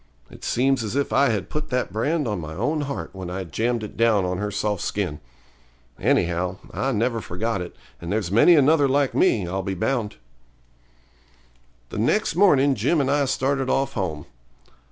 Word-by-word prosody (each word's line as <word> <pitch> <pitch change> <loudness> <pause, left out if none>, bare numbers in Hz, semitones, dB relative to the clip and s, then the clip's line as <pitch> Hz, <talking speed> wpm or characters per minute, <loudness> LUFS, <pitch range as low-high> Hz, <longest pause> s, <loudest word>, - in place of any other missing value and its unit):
It - - -14
seems 130 0 +1
as 110 +3 -4
if 140 0 0
I 140 -1 +4
had 100 -4 -1
put 150 - -4
that 125 -7 -1
brand 145 +6 0
on 105 -5 -2
my 80 0 -7
own 145 - -1
heart 140 - -5
when 95 -2 -7
I 95 +2 -4
jammed 115 +8 -1
it 105 - -8
down 110 -4 +3
on 90 0 -2
her 105 0 -2
soft 105 -1 -2
skin. 90 -8 -2 0.8
Anyhow, 90 +2 +1 0.2
I 135 - -1
never 115 0 0
forgot 105 +3 -3
it, 90 - -7 0.3
and 85 - -5
there's 100 -4 -1
many 120 - +6
another 145 0 +4
like 140 0 +1
me, 100 -5 +2
I'll 95 +2 -2
be 95 0 -3
bound. 110 +2 -1 1.7
The - - -5
next 160 - +1
morning 145 -8 +4
Jim 130 +8 +1
and 140 -1 +1
I 145 0 +2
started 135 0 0
off 135 +1 0
home. 80 -8 -3
115 Hz, 180 wpm, -23 LUFS, 95-135 Hz, 1.7 s, many